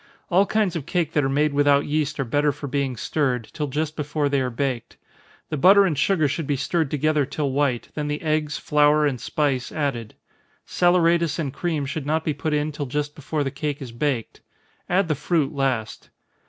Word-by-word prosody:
All 190 Hz, +3 st, +4 dB
kinds 210 Hz, -5 st, +1 dB
of 155 Hz, -3 st, -4 dB
cake 170 Hz, -4 st, 0 dB
that 150 Hz, -, +2 dB
are 135 Hz, -, +1 dB
made 145 Hz, +2 st, +1 dB
without 145 Hz, 0 st, +3 dB
yeast 150 Hz, -1 st, -1 dB
are -, -, +2 dB
better 145 Hz, +5 st, +2 dB
for 145 Hz, -, -8 dB
being 140 Hz, -2 st, -2 dB
stirred, 125 Hz, -4 st, -1 dB
till 150 Hz, -2 st, -2 dB
just 155 Hz, +3 st, -2 dB
before 150 Hz, -1 st, -1 dB
they 140 Hz, -1 st, +1 dB
are 130 Hz, -, -1 dB
baked. 125 Hz, -1 st, -3 dB, 0.5 s
The 155 Hz, -, -2 dB
butter 195 Hz, +7 st, +6 dB
and 170 Hz, -5 st, 0 dB
sugar 155 Hz, +1 st, +2 dB
should 145 Hz, +2 st, -3 dB
be 145 Hz, -, +1 dB
stirred 145 Hz, +3 st, 0 dB
together 150 Hz, +1 st, +1 dB
till 140 Hz, +1 st, -2 dB
white, 135 Hz, -3 st, 0 dB
then 150 Hz, -1 st, -3 dB
the 150 Hz, 0 st, -2 dB
eggs, 155 Hz, -1 st, 0 dB
flour, 150 Hz, 0 st, +3 dB
and 135 Hz, -5 st, -1 dB
spice, 140 Hz, -5 st, -1 dB
added. 130 Hz, -8 st, -3 dB, 0.5 s
Saleratus 170 Hz, -2 st, +2 dB
and 145 Hz, -6 st, -3 dB
cream 160 Hz, -5 st, -2 dB
should 145 Hz, +1 st, -4 dB
not 160 Hz, +1 st, +1 dB
be 155 Hz, -, +1 dB
put 150 Hz, +2 st, -3 dB
in 150 Hz, +1 st, 0 dB
till 145 Hz, -1 st, -5 dB
just 145 Hz, +2 st, -2 dB
before 150 Hz, +1 st, -3 dB
the 135 Hz, -, -2 dB
cake 145 Hz, 0 st, -3 dB
is 130 Hz, -4 st, -7 dB
baked 120 Hz, -1 st, -2 dB, 0.5 s
add 185 Hz, +1 st, +2 dB
the 155 Hz, -, +1 dB
fruit 150 Hz, 0 st, 0 dB
last. 130 Hz, -6 st, -2 dB
150 Hz, 205 wpm, -23 LUFS, 140-155 Hz, 0.5 s, butter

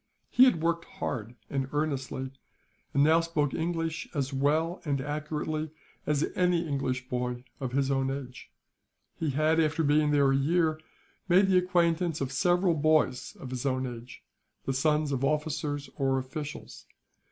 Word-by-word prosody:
He 255 Hz, -, +7 dB
had 170 Hz, -11 st, +2 dB
worked 170 Hz, 0 st, 0 dB
hard 115 Hz, 0 st, -5 dB
and 135 Hz, -1 st, -2 dB
earnestly, 135 Hz, -3 st, -2 dB, 0.6 s
and 140 Hz, -, +3 dB
now 160 Hz, +2 st, +5 dB
spoke 165 Hz, -4 st, 0 dB
English 165 Hz, -1 st, -2 dB
as 140 Hz, -1 st, -1 dB
well 155 Hz, +6 st, +1 dB
and 140 Hz, -3 st, -1 dB
accurately 155 Hz, +2 st, -3 dB, 0.4 s
as 150 Hz, 0 st, +2 dB
any 175 Hz, -2 st, +1 dB
English 130 Hz, -3 st, -2 dB
boy 125 Hz, -1 st, -3 dB, 0.2 s
of 130 Hz, -3 st, -4 dB
his 135 Hz, 0 st, +1 dB
own 135 Hz, -1 st, +1 dB
age. 135 Hz, -2 st, -6 dB, 0.6 s
He 160 Hz, -, -2 dB
had, 155 Hz, +4 st, +2 dB
after 160 Hz, 0 st, +2 dB
being 150 Hz, +1 st, +3 dB
there 140 Hz, -2 st, +4 dB
a -, -, +3 dB
year, 155 Hz, +2 st, +1 dB, 0.5 s
made 185 Hz, +3 st, +6 dB
the 185 Hz, -1 st, +5 dB
acquaintance 175 Hz, -2 st, +1 dB
of 135 Hz, -2 st, -2 dB
several 175 Hz, +5 st, +2 dB
boys 155 Hz, -4 st, +1 dB
of 130 Hz, -, -9 dB
his 125 Hz, -2 st, -3 dB
own 130 Hz, -1 st, 0 dB
age, 120 Hz, 0 st, -8 dB, 0.4 s
the 135 Hz, -, 0 dB
sons 150 Hz, +2 st, +1 dB
of 135 Hz, -1 st, -1 dB
officers 150 Hz, -1 st, -1 dB
or 135 Hz, -1 st, +1 dB
officials. 145 Hz, +3 st, -6 dB
150 Hz, 155 wpm, -29 LUFS, 135-160 Hz, 0.6 s, He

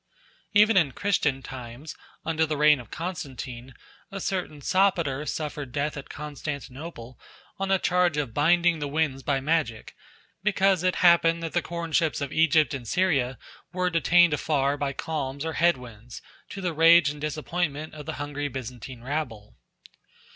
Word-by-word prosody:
Even 210 Hz, +1 st, +5 dB
in 150 Hz, -8 st, +3 dB
Christian 150 Hz, -9 st, 0 dB
times, 130 Hz, +4 st, -8 dB, 0.3 s
under 160 Hz, 0 st, +1 dB
the 155 Hz, -1 st, -1 dB
reign 150 Hz, -1 st, +5 dB
of 120 Hz, -, -11 dB
Constantine, 135 Hz, -8 st, -6 dB, 0.4 s
a 195 Hz, -, -5 dB
certain 180 Hz, -6 st, -3 dB
Sopater 170 Hz, -5 st, +1 dB
suffered 150 Hz, -4 st, -4 dB
death 150 Hz, +2 st, -2 dB
at 140 Hz, -, -8 dB
Constantinople 140 Hz, -3 st, -7 dB, 0.4 s
on 195 Hz, 0 st, -2 dB
a 195 Hz, -, +4 dB
charge 180 Hz, -3 st, +2 dB
of 140 Hz, -6 st, -2 dB
binding 170 Hz, +3 st, +3 dB
the 145 Hz, -, -2 dB
winds 140 Hz, -2 st, -1 dB
by 135 Hz, 0 st, 0 dB
magic, 135 Hz, -6 st, -1 dB, 0.5 s
because 195 Hz, -2 st, +2 dB
it 185 Hz, 0 st, +1 dB
happened 170 Hz, -1 st, +5 dB
that 165 Hz, -, -4 dB
the 175 Hz, -, +2 dB
corn 170 Hz, 0 st, -5 dB
ships 155 Hz, 0 st, +1 dB
of 140 Hz, -1 st, -4 dB
Egypt 160 Hz, -1 st, +3 dB
and 125 Hz, -4 st, -6 dB
Syria 140 Hz, -, +1 dB, 0.4 s
were 180 Hz, 0 st, 0 dB
detained 175 Hz, 0 st, +4 dB
afar 140 Hz, -2 st, +1 dB
off 145 Hz, -, -6 dB
by 140 Hz, -1 st, -1 dB
calms 140 Hz, 0 st, -4 dB
or 160 Hz, -, -2 dB
head 170 Hz, -3 st, +3 dB
winds, 120 Hz, -1 st, -11 dB, 0.3 s
to 195 Hz, -, -7 dB
the 180 Hz, -3 st, -1 dB
rage 165 Hz, -1 st, +6 dB
and 145 Hz, 0 st, -10 dB
disappointment 155 Hz, 0 st, -3 dB
of 150 Hz, -2 st, -10 dB
the -, -, -3 dB
hungry 145 Hz, 0 st, -4 dB
Byzantine 125 Hz, -2 st, -8 dB
rabble. 125 Hz, -7 st, -4 dB
150 Hz, 160 wpm, -26 LUFS, 135-170 Hz, 0.5 s, rage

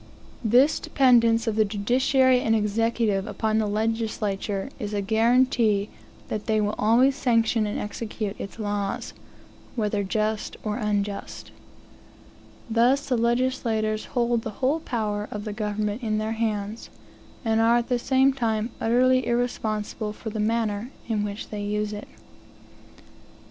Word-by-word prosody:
This 250 Hz, +7 st, +4 dB
dependence 235 Hz, -4 st, +4 dB
of 225 Hz, -2 st, -1 dB
the 220 Hz, -, +4 dB
judiciary 250 Hz, +5 st, +2 dB
and 225 Hz, -2 st, +2 dB
executive 215 Hz, -1 st, 0 dB
upon 220 Hz, -1 st, 0 dB
the 215 Hz, -, 0 dB
legislature 215 Hz, 0 st, -2 dB
is 210 Hz, -3 st, -4 dB
a 200 Hz, -, 0 dB
guaranty 225 Hz, -1 st, +2 dB, 0.4 s
that 210 Hz, -, -4 dB
they 220 Hz, -1 st, +2 dB
will 210 Hz, 0 st, 0 dB
always 245 Hz, +6 st, +4 dB
sanction 230 Hz, -4 st, +2 dB
and 205 Hz, -, -3 dB
execute 210 Hz, -1 st, -4 dB
its 195 Hz, -, -7 dB
laws, 205 Hz, -2 st, -3 dB, 0.6 s
whether 210 Hz, -3 st, 0 dB
just 215 Hz, +2 st, -2 dB
or 210 Hz, 0 st, -2 dB
unjust. 205 Hz, -3 st, -3 dB, 1.2 s
Thus 245 Hz, +5 st, +2 dB
the 260 Hz, -, +1 dB
legislators 230 Hz, -2 st, 0 dB
hold 240 Hz, -2 st, 0 dB
the 225 Hz, -, -5 dB
whole 275 Hz, +5 st, +1 dB
power 210 Hz, -7 st, -2 dB
of 210 Hz, 0 st, -5 dB
the 210 Hz, -, -4 dB
government 210 Hz, +1 st, -2 dB
in 215 Hz, -2 st, -1 dB
their 215 Hz, +1 st, -2 dB
hands, 220 Hz, -1 st, -3 dB, 0.6 s
and 225 Hz, 0 st, +2 dB
are 230 Hz, +1 st, +5 dB
at 240 Hz, -, -1 dB
the 245 Hz, -2 st, +1 dB
same 265 Hz, +2 st, +3 dB
time 225 Hz, -3 st, -1 dB
utterly 255 Hz, +2 st, +3 dB
irresponsible 220 Hz, -3 st, -2 dB
for 220 Hz, +1 st, -7 dB
the 215 Hz, -, -4 dB
manner 220 Hz, 0 st, 0 dB, 0.2 s
in 215 Hz, -3 st, 0 dB
which 205 Hz, 0 st, -5 dB
they 210 Hz, -1 st, -5 dB
use 210 Hz, +1 st, -2 dB
it. 210 Hz, -, -7 dB
220 Hz, 140 wpm, -25 LUFS, 210-240 Hz, 1.2 s, are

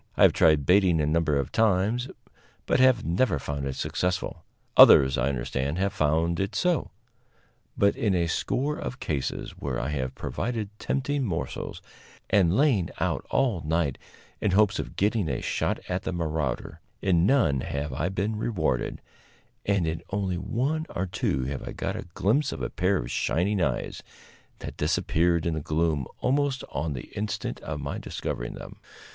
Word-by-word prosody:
I -, -, +5 dB
have -, -, +7 dB
tried 75 Hz, -4 st, +4 dB
baiting 90 Hz, -3 st, +4 dB
a 75 Hz, -, +2 dB
number 80 Hz, 0 st, +1 dB
of 70 Hz, -2 st, -2 dB
times, 110 Hz, +4 st, +2 dB, 0.6 s
but -, -, +2 dB
have 130 Hz, -3 st, +4 dB
never 85 Hz, +2 st, +2 dB
found 70 Hz, 0 st, -4 dB
it 65 Hz, -, -3 dB
successful. 90 Hz, -2 st, -2 dB, 0.3 s
Others, 65 Hz, 0 st, +8 dB
I 65 Hz, +2 st, +1 dB
understand, 70 Hz, +3 st, -2 dB
have 100 Hz, +1 st, 0 dB
found 80 Hz, 0 st, +1 dB
it 95 Hz, 0 st, -2 dB
so; 175 Hz, -4 st, +1 dB, 0.9 s
but 100 Hz, 0 st, +3 dB
in 105 Hz, -4 st, +1 dB
a 85 Hz, -1 st, +2 dB
score 135 Hz, -, -1 dB
of 125 Hz, -, -5 dB
cases, 70 Hz, -4 st, -3 dB
where -, -, -2 dB
I 65 Hz, -, -2 dB
have 65 Hz, -3 st, -3 dB
provided 115 Hz, -4 st, -3 dB
tempting 140 Hz, +1 st, -1 dB
morsels, 90 Hz, -9 st, -4 dB, 0.5 s
and 95 Hz, -1 st, +4 dB
lain 130 Hz, -, +3 dB
out -, -, -1 dB
all 120 Hz, -11 st, +1 dB
night 80 Hz, -3 st, 0 dB, 0.4 s
in 105 Hz, -, +2 dB
hopes 100 Hz, 0 st, +3 dB
of -, -, -5 dB
getting 105 Hz, -3 st, +1 dB
a -, -, -1 dB
shot -, -, -1 dB
at 90 Hz, +1 st, -1 dB
the 95 Hz, -, -3 dB
marauder, 80 Hz, -3 st, -3 dB, 0.2 s
in 90 Hz, -2 st, +3 dB
none 115 Hz, -, +3 dB
have 70 Hz, +3 st, -3 dB
I 85 Hz, -, -1 dB
been 100 Hz, +3 st, -2 dB
rewarded, 80 Hz, -, -1 dB, 0.7 s
and 100 Hz, -4 st, +2 dB
in 80 Hz, 0 st, -2 dB
only 95 Hz, -3 st, -1 dB
one 140 Hz, -, -1 dB
or 95 Hz, -, -2 dB
two 65 Hz, -7 st, -1 dB
have 70 Hz, +2 st, -4 dB
I -, -, -6 dB
got -, -, -3 dB
a -, -, -6 dB
glimpse 135 Hz, +10 st, +2 dB
of 65 Hz, -, -5 dB
a -, -, -3 dB
pair 95 Hz, +2 st, +1 dB
of -, -, -4 dB
shining 95 Hz, +3 st, 0 dB
eyes, -, -, -1 dB, 0.6 s
that -, -, -7 dB
disappeared 85 Hz, 0 st, +1 dB
in 85 Hz, -, +1 dB
the 80 Hz, -, -2 dB
gloom 75 Hz, -3 st, 0 dB
almost 140 Hz, 0 st, +1 dB
on 75 Hz, +2 st, -2 dB
the 65 Hz, -, -8 dB
instant 105 Hz, +1 st, -3 dB
of 75 Hz, -1 st, -5 dB
my 70 Hz, 0 st, -4 dB
discovering -, -, -4 dB
them. -, -, -10 dB
90 Hz, 170 wpm, -27 LUFS, 75-105 Hz, 0.9 s, Others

